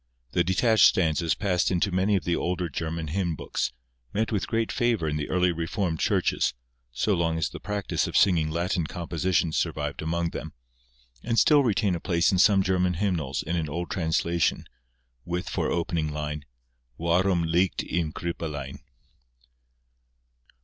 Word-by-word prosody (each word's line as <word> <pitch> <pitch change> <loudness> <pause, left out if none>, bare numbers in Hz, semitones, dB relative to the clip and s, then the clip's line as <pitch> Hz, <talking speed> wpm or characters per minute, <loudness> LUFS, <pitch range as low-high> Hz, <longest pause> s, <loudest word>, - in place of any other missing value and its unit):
The - - +2
detached 110 +4 +4
stanzas 80 -2 +3
passed 95 -2 +1
into 95 +2 +1
many 95 +3 +2
of 95 - 0
the 85 +2 0
older 90 0 -2
German 80 +1 -4
hymn 85 -1 -1
books, 65 - -2 0.4
met 110 +2 0
with 105 -3 -1
great 115 -1 0
favour 120 -9 +1
in 75 - -1
the 75 -1 -3
early 90 -1 +2
Reformed 85 0 -2
Churches, 65 - +1 0.4
so 100 - 0
long 85 -2 0
as 80 - 0
the - - -9
practice 105 -2 -2
of - - 0
singing 85 -6 +4
Latin 85 0 -1
compositions 85 -1 -1
survived 75 -4 -2
among 85 +1 -1
them, - - -6 0.7
and 115 0 -1
still 145 +2 +5
retain 105 -5 +1
a 85 - -2
place 85 -1 +2
in 95 - +1
some 100 0 +5
German 90 -1 +1
hymnals 80 -8 -1
in 85 - -2
an 80 -3 -1
old 85 +4 -4
translation, 85 0 0 0.6
with 90 +2 -3
for - - -1
opening 85 -2 -1
line, 75 -1 -4 0.5
Warum 85 +1 +2
liegt 85 +3 +1
im 85 -2 -1
Krippelein. 75 -5 -5
85 Hz, 155 wpm, -26 LUFS, 80-95 Hz, 0.7 s, still